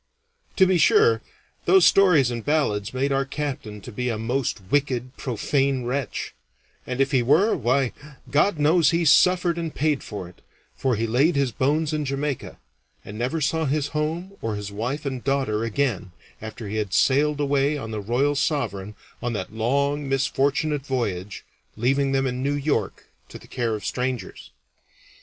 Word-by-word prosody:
To 190 - +6
be 185 -1 +2
sure, 435 - +4 0.4
those 380 -1 +6
stories 165 -11 +5
and 115 -2 -4
ballads 110 -9 0
made 135 +2 -1
our 135 0 +2
captain 135 -7 -5
to - - -9
be 125 +3 -2
a 115 - -2
most 120 +2 -1
wicked, 130 -3 0
profane 135 +1 0
wretch; 135 +2 -3 0.5
and 125 0 -4
if 135 0 +2
he 130 - +3
were, 155 - +3
why, 125 +1 +1 0.4
God 155 +6 +3
knows 150 +1 +4
he 170 +1 +1
suffered 175 +2 +4
and 165 -2 -4
paid 150 -1 +1
for 100 -4 -7
it, 90 - -17 0.3
for 130 -3 0
he 115 +2 -1
laid 135 +9 +2
his 140 -3 +1
bones 150 +6 0
in 155 -1 -1
Jamaica, 140 0 -3 0.5
and 105 - -8
never 125 +8 -2
saw 160 +2 0
his 145 +1 0
home 160 +5 -2
or 110 -1 -2
his 105 -1 -6
wife 125 +9 -3
and 130 -3 -4
daughter 135 -6 0
again 115 -5 -1 0.3
after 110 0 -7
he 105 +2 -3
had 105 -3 -2
sailed 145 +2 +3
away 145 +1 +1
on 110 -5 -6
the 110 -1 -3
Royal 125 +8 +1
Sovereign 120 -9 -2 0.3
on 120 -1 -2
that 100 -1 -5
long 140 +5 0
misfortunate 140 +2 0
voyage, 105 -8 -3 0.3
leaving 135 +4 +1
them 135 0 +1
in 125 -1 -2
New 140 +2 0
York 145 +1 -2 0.2
to - - -9
the - - -16
care 120 -3 -2
of 105 - -7
strangers. 125 -5 -4
135 Hz, 170 wpm, -24 LUFS, 115-150 Hz, 0.5 s, To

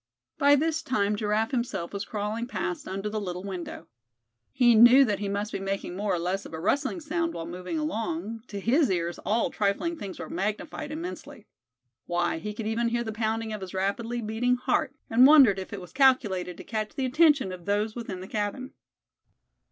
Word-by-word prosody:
By 285 -1 +6
this 320 +2 0
time 210 -8 0
Giraffe 215 +3 0
himself 225 -9 -2
was 200 0 -3
crawling 215 +3 -3
past 180 -8 -4
under 195 +2 -3
the 215 0 -3
little 180 -2 -5
window. 185 -3 -6 0.6
He 240 -2 +5
knew 240 +5 +8
that 205 -4 -1
he 205 -1 -2
must 205 +2 -2
be - - -3
making 195 -2 -3
more 200 -1 0
or - - -1
less 180 +3 -2
of - - -8
a - - -6
rustling 275 - 0
sound 335 +1 -2
while 165 - -4
moving 180 - -5
along; 225 - -3
to 205 - -6
his 265 +9 +3
ears 175 -2 -1
all 225 +2 0
trifling 210 +12 0
things 200 - -7
were - - -6
magnified 215 - -3
immensely; 335 +4 -7 0.6
why, 175 -1 0
he 210 +5 -5
could 220 - -5
even 225 +2 0
hear 235 0 0
the 220 - -4
pounding 220 0 -2
of 210 - -5
his 190 0 -7
rapidly 230 +5 -2
beating 225 +4 +1
heart, 250 - 0
and 245 +3 +7
wondered 270 -10 +7
if 190 - -7
it 200 - -5
was 180 - -12
calculated 210 -10 +2
to - - -9
catch 215 -2 -4
the 265 - -1
attention 285 - +4
of 180 -2 -9
those 210 +2 0
within 215 -6 -5
the 190 - -8
cabin. 215 +6 -3
215 Hz, 200 wpm, -27 LUFS, 195-250 Hz, 0.6 s, knew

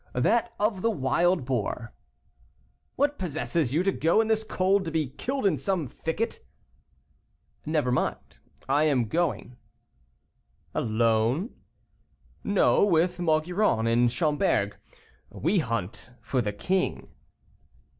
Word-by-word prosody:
"That 230 - +2
of 205 -2 0
the 230 - +2
wild 170 - +1
boar." 120 -2 -3 1.0
"What 290 +2 0
possesses 160 -4 -1
you 160 +6 +1
to 195 - +2
go, 165 +3 +2
in 225 0 +1
this 220 0 +2
cold, 195 -1 +1
to - - -2
be 155 -4 -1
killed 265 - -3
in 165 -9 +2
some 175 +2 -1
thicket?" 230 - -4 1.2
"Never 150 -5 +1
mind, 125 - -2 0.3
I 145 +3 +3
am 135 -6 +2
going." 145 -2 -2 1.2
"Alone?" 115 - +1 0.9
"No, 205 0 +3
with 175 -2 +2
Maugiron 160 - +1
and 120 +1 +3
Schomberg. 145 - +1 0.5
We 180 +6 0
hunt 115 - -4
for 130 - 0
the 105 -3 -2
king." 185 - -1
160 Hz, 115 wpm, -27 LUFS, 125-190 Hz, 1.2 s, I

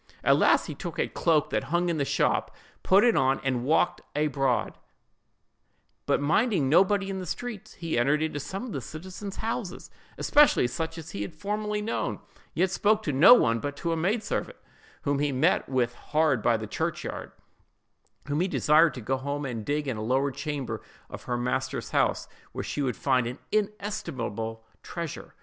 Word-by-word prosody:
At - - +5
last - - +4
he - - -5
took - - -7
a - - +1
cloak 155 -4 +1
that - - 0
hung 175 +3 0
in 170 -3 0
the 140 - +1
shop, - - 0 0.3
put 195 +2 +5
it 240 -2 +4
on 135 -2 +2
and 130 -3 0
walked 150 +5 +2
abroad, 135 -4 0 1.3
but - - +2
minding 160 - +2
nobody 195 +6 +3
in 190 - -4
the 185 - -5
streets; 235 +2 -6
he 165 -7 -2
entered 140 +5 +2
into 155 -2 -2
some 190 - -5
of 245 - -7
the 140 - -4
citizen's 185 - -8
houses, 225 -4 -4 0.3
especially 295 - +5
such 160 +6 -3
as 165 0 -8
he 100 - -5
had 155 - -5
formerly 210 +3 -2
known, 225 - -2 0.4
yet 185 0 +2
spoke 215 +3 +2
to 150 - -1
no 150 - +9
one 115 - +2
but 145 +2 -4
to 170 - -2
a - - +1
maid 200 +8 0
servant, - - -3 0.5
whom 140 -1 0
he 145 0 +1
met 130 -1 +2
with 125 -3 +1
hard 150 -2 +1
by 115 0 +3
the 110 - -5
church - - -3
yard, - - -6 1.0
whom 145 +2 0
he 185 - +2
desired 160 -2 +4
to 125 - -6
go 130 +5 -1
home 140 +2 -3
and 115 -5 -5
dig 145 0 -1
in 125 -5 -2
a - - -4
lower 135 +5 +1
chamber 135 -6 -4 0.3
of - - -9
her 120 - -1
master's 130 +2 -2
house, - - +1 0.3
where - - -4
she 145 - -3
would 130 -3 -1
find 130 -3 +1
an 125 +3 -5
inestimable 130 - -3 0.2
treasure. 170 -3 -7
150 Hz, 190 wpm, -27 LUFS, 130-190 Hz, 1.3 s, no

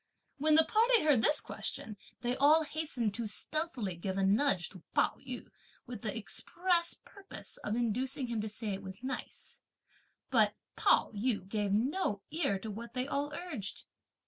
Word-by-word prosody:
When 305 +1 +5
the 320 - +8
party 460 0 +4
heard 290 -7 +4
this 300 +5 +4
question, 215 - -4 0.3
they 245 0 +1
all 300 +4 +6
hastened 290 -8 -1
to 225 +1 -2
stealthily 250 - -2
give 190 +3 -3
a 195 - +1
nudge 200 -2 +3
to 185 - -12
Pao - - +3
yü, 255 -2 -6 0.4
with 240 -4 -7
the 215 0 -2
express 340 - 0
purpose 395 -1 -10
of 210 - -3
inducing 255 +4 +1
him 235 -3 -2
to 215 - -3
say 215 +1 -4
it 190 - -5
was 190 +4 -9
nice; 260 0 -6 0.7
but - - +4 0.2
Pao - - +4
yü 210 -3 0
gave 205 -1 -1
no 220 - 0
ear 310 - +1
to 215 +3 -6
what 235 +5 -8
they 255 +1 0
all 285 +1 -1
urged. 295 - -5
245 Hz, 170 wpm, -33 LUFS, 210-300 Hz, 0.7 s, the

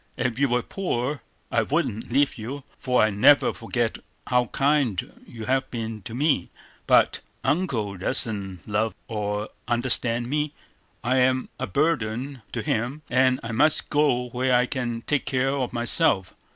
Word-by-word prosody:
If 125 0 -1
you 140 -1 +3
were 120 0 +1
poor, 145 -7 -2 0.3
I - - +3
wouldn't 110 +3 -1
leave 140 +2 +2
you; 130 +6 -6 0.2
for 125 -3 +2
I 110 - +3
never 110 +8 +5
forget 115 0 -2 0.3
how 125 -1 +2
kind 135 -7 0
you 115 -2 -8
have 135 +1 0
been 115 -2 -5
to 110 +4 -8
me. 140 - +1 0.4
But - - +4 0.2
Uncle 130 - 0
doesn't 100 -4 0
love 110 +1 0
or 105 -1 -3 0.2
understand 120 -1 +1
me; 150 +2 -1 0.5
I 125 +3 +2
am 130 0 +2
a - - -2
burden 130 - -1
to 115 - -3
him, 125 +9 -2
and 130 +1 +3
I 115 - -4
must 145 +7 +2
go 140 -5 +2
where 125 +1 +1
I 125 0 +4
can 120 -3 -2
take 145 -2 0
care 130 0 +1
of 130 -3 -2
myself. 115 -5 +2
125 Hz, 155 wpm, -25 LUFS, 115-135 Hz, 0.5 s, never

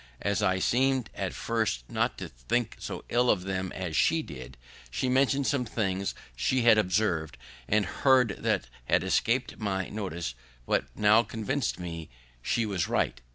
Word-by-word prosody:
As 100 -2 +1
I 95 0 +2
seem'd 130 +3 +1
at 95 -2 -3
first 110 - -1
not - - -1
to - - -5
think 105 - -2
so - - -6
ill 125 +1 +3
of 90 -4 +2
them 95 -1 -2
as 90 -4 -4
she 160 - +3
did, 65 - -9 0.3
she 130 - -1
mentioned 135 +2 +2
some 140 -2 +1
things 100 -4 -2 0.2
she 130 - +1
had 110 -2 +7
observ'd 90 -5 0 0.3
and 105 0 +2
heard 130 -3 +3
that - - 0 0.2
had - - +2
escap'd 125 +3 0
my 95 -3 -2
notice, 85 - -4 0.3
but - - +1
now 105 +2 +6
convinc'd 115 +2 -2
me 85 -2 -6 0.3
she 115 - 0
was 95 -6 -1
right. - - 0
105 Hz, 160 wpm, -28 LUFS, 90-120 Hz, 0.3 s, had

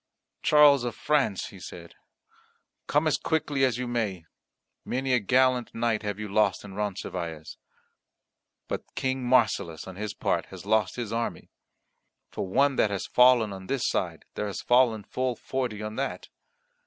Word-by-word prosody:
"Charles 145 -3 +6
of 120 -1 -3
France," 140 -10 0
he 95 - -13
said, 85 -1 -10 0.9
"come 150 +2 +2
as 145 -2 +2
quickly 150 -4 0
as 125 -3 +2
you 125 0 -3
may, 105 -8 -2 0.6
many 130 +1 -1
a 125 - +4
gallant 125 +3 +2
knight 115 -1 0
have 105 -2 -3
you 105 0 -5
lost 105 +1 +1
in 100 - -9
Roncesvalles. 90 -6 -4 1.1
But - - -6
King 130 -1 -1
Marsilas, 105 -9 +1
on 95 -1 -9
his 105 0 -4
part, - - -1
has - - -11
lost 110 -1 +1
his 120 -3 -4
army. 115 0 -3 0.8
For - - -4
one 135 +7 +2
that 105 - +3
has 100 -1 -3
fallen 125 -4 +5
on 95 -1 -9
this 135 -3 0
side - - -2
there 105 - -3
has 100 - -5
fallen 120 -4 +3
full 130 +2 -2
forty 120 -4 -3
on 110 +1 -5
that." 135 +1 -3
115 Hz, 160 wpm, -27 LUFS, 100-130 Hz, 1.1 s, Charles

